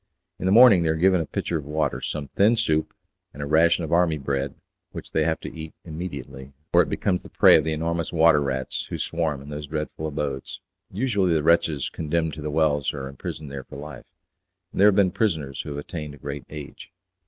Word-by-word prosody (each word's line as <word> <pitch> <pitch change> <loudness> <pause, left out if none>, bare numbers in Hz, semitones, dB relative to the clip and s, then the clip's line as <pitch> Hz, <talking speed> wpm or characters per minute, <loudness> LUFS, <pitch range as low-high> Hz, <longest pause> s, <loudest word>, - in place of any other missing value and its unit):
In 95 - -2
the - - +3
morning 115 -4 +8
they 80 - +1
are 80 - +2
given 90 +2 +3
a 80 - -5
pitcher 85 - -2
of 70 - -10
water, 75 -4 -1
some 75 -3 -4
thin 105 +4 +3
soup, 80 -7 0 0.4
and 70 - -5
a - - -3
ration 85 +3 +3
of 80 - -5
army 85 -2 +3
bread 70 -1 -2 0.4
which - - -8
they 80 - +2
have 80 -1 0
to - - -8
eat 80 -1 -8
immediately, 70 -5 -7 0.2
or - - +7
it - - -1
becomes 90 -2 0
the - - -13
prey - - +6
of 80 - +4
the 80 - -1
enormous 85 +1 -2
water 80 -2 +5
rats 65 -2 -2
who - - -4
swarm 80 -5 -2
in 70 - -11
those 75 0 -6
dreadful 75 +1 -4
abodes. 70 -3 -4 0.3
Usually 100 -5 +1
the 75 - +1
wretches 80 -3 +2
condemned 80 0 -2
to 80 - -7
The 75 - -3
Wells 75 -2 +1
are 70 -1 -5
imprisoned 70 +2 -7
there 70 -1 -6
for - - -13
life, 70 -2 -9 0.6
and - - -2
there 100 - +8
have 105 - +5
been 95 -3 +4
prisoners 80 -10 -1
who - - -8
have 70 - -5
attained 75 0 -6
a - - -16
great 70 +1 -6
age. 75 -2 -9
80 Hz, 220 wpm, -24 LUFS, 70-85 Hz, 0.6 s, morning